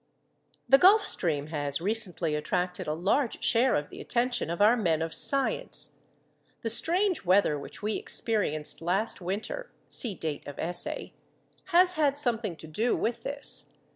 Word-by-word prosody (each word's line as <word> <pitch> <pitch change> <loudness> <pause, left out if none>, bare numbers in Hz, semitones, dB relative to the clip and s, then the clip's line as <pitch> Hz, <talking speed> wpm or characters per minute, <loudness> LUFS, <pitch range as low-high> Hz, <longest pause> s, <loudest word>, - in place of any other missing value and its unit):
_ - - -44 0.6
The 270 - +7
Gulf 405 +6 +6
Stream 155 -4 -1
has 145 -2 -1
recently 185 -4 -1
attracted 180 +4 -2
a 150 - 0
large 210 - 0
share 245 +3 +3
of 145 0 -2
the - - -9
attention 245 -5 -1
of 170 - -3
our 215 +4 +6
men 170 -9 +1
of 165 - -4
science. 275 -1 -1 0.7
The 225 - +1
strange 360 - +2
weather 180 -5 +3
which 140 - -10
we 215 0 0
experienced 175 -11 -1
last 190 +6 0
winter 220 - -4 0.2
(see 225 -7 -3
date 155 -3 -5
of 145 - -8
essay) 175 +2 -3 0.5
has 360 0 +4
had 290 -4 +1
something 230 - 0
to 160 - -11
do 215 +10 0
with 235 +1 -2
this. 280 0 -4
205 Hz, 160 wpm, -28 LUFS, 165-265 Hz, 0.7 s, The